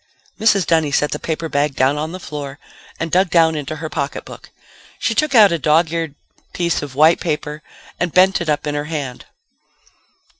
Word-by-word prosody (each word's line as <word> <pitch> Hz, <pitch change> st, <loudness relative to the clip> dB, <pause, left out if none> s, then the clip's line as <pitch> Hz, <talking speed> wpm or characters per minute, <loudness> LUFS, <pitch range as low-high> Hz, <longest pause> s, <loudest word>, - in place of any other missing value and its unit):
Mrs. 205 Hz, -4 st, +3 dB
Dunny 160 Hz, -2 st, +2 dB
set 150 Hz, +1 st, +1 dB
the 150 Hz, -, -3 dB
paper 165 Hz, 0 st, -3 dB
bag 145 Hz, -2 st, 0 dB
down 130 Hz, +2 st, +2 dB
on 155 Hz, +2 st, -3 dB
the 185 Hz, -, -7 dB
floor 145 Hz, -4 st, -7 dB, 0.4 s
and 165 Hz, 0 st, -3 dB
dug 185 Hz, +1 st, +3 dB
down 165 Hz, -2 st, +4 dB
into 150 Hz, 0 st, -4 dB
her 160 Hz, +1 st, -5 dB
pocketbook. 145 Hz, -3 st, -6 dB, 0.5 s
She -, -, -1 dB
took 305 Hz, -4 st, 0 dB
out 210 Hz, -4 st, +7 dB
a 170 Hz, -, 0 dB
dog 155 Hz, +2 st, +2 dB
eared 165 Hz, -3 st, -3 dB, 0.4 s
piece 170 Hz, -2 st, 0 dB
of 140 Hz, -3 st, -7 dB
white 155 Hz, +4 st, +5 dB
paper 150 Hz, -2 st, -3 dB, 0.4 s
and 175 Hz, -1 st, -1 dB
bent 190 Hz, +2 st, +4 dB
it 170 Hz, -, -3 dB
up 150 Hz, 0 st, 0 dB
in 150 Hz, -, -2 dB
her 145 Hz, 0 st, -2 dB
hand. 145 Hz, -5 st, -5 dB
155 Hz, 190 wpm, -19 LUFS, 150-170 Hz, 0.5 s, out